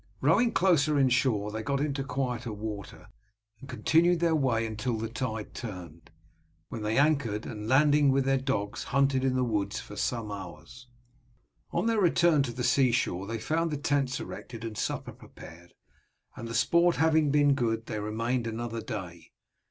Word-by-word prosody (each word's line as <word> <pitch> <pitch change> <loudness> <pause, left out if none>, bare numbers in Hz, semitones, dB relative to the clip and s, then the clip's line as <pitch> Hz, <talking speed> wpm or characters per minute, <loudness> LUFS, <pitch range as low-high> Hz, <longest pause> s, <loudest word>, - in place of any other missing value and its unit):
Rowing 200 - +3
closer 155 -5 +3
inshore 125 -6 +2
they 110 +1 -4
got 140 +5 -1
into 140 -1 -1
quieter 125 -3 -3
water, 105 -1 -7 0.5
and 135 - -12
continued 170 +2 +2
their 170 -1 +2
way 125 -7 +1
until 115 +1 -3
tide 110 -2 -4
turned, 90 -8 -8 0.6
when 115 - -6
they 105 +1 -1
anchored, 135 -8 +1
and 105 -1 -6
landing 145 +2 +4
with 135 0 +1
their 135 0 +2
dogs 115 -7 -2
hunted 135 0 +1
in 130 -1 +1
the 130 - +1
woods 105 -4 -1
for 105 - -10
some 115 -1 -2
hours. 95 +5 -9 0.8
On - - -1
their 225 -2 +2
return 170 -3 +4
to 130 -3 -2
the 125 +1 -5
sea 125 +1 +3
shore 100 -5 -1
they 115 +1 -3
found 165 +8 -1
the 150 - -2
tents 140 -2 0
erected 115 -2 -8
and 110 -1 -5
supper - - -3
prepared, 85 +1 -14 0.6
and 115 - -7
the 115 - -5
sport 170 +8 +3
having 160 -2 +3
been 145 0 +4
good 115 -4 -1
they 110 -2 -4
remained 115 +3 -2
another 115 0 -4
day. 95 -7 -7
125 Hz, 165 wpm, -28 LUFS, 110-145 Hz, 0.8 s, landing